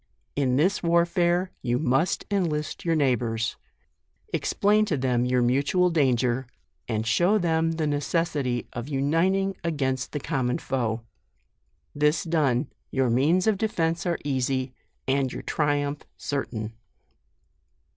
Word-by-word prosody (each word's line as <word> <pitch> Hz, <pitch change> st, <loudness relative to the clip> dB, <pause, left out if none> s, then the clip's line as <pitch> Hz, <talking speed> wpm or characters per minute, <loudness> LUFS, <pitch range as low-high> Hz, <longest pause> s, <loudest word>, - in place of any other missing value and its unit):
In 130 Hz, -3 st, +1 dB
this 185 Hz, +9 st, +2 dB
warfare 175 Hz, +1 st, +2 dB
you 120 Hz, -1 st, 0 dB
must 140 Hz, +4 st, +1 dB
en 195 Hz, -3 st, +2 dB
list 150 Hz, -2 st, -3 dB
your 165 Hz, -1 st, +1 dB
neighbours; 120 Hz, -6 st, 0 dB, 0.8 s
explain 210 Hz, +1 st, +2 dB
to 160 Hz, -8 st, -1 dB
them 125 Hz, -2 st, +1 dB
your 125 Hz, 0 st, +2 dB
mutual 140 Hz, +9 st, +2 dB
danger, 130 Hz, -4 st, +1 dB, 0.4 s
and 110 Hz, -1 st, -1 dB
show 175 Hz, -, +3 dB
them 165 Hz, -3 st, +1 dB
the 160 Hz, -1 st, -1 dB
necessity 145 Hz, -4 st, -1 dB
of 120 Hz, +1 st, -5 dB
uniting 170 Hz, +8 st, +1 dB
against 130 Hz, -6 st, -1 dB
the 150 Hz, -, -3 dB
common 125 Hz, -2 st, -1 dB
foe; 115 Hz, -3 st, -2 dB, 0.9 s
this 150 Hz, +2 st, +2 dB
done, 150 Hz, -5 st, +1 dB, 0.2 s
your 130 Hz, -3 st, +1 dB
means 155 Hz, +10 st, +3 dB
of 215 Hz, -3 st, +2 dB
defence 170 Hz, -5 st, 0 dB
are 170 Hz, -, +1 dB
easy, 130 Hz, -1 st, -1 dB, 0.3 s
and 135 Hz, -1 st, +1 dB
your -, -, -6 dB
triumph 145 Hz, -1 st, 0 dB, 0.2 s
certain. 115 Hz, -6 st, -3 dB
145 Hz, 125 wpm, -26 LUFS, 125-170 Hz, 0.9 s, show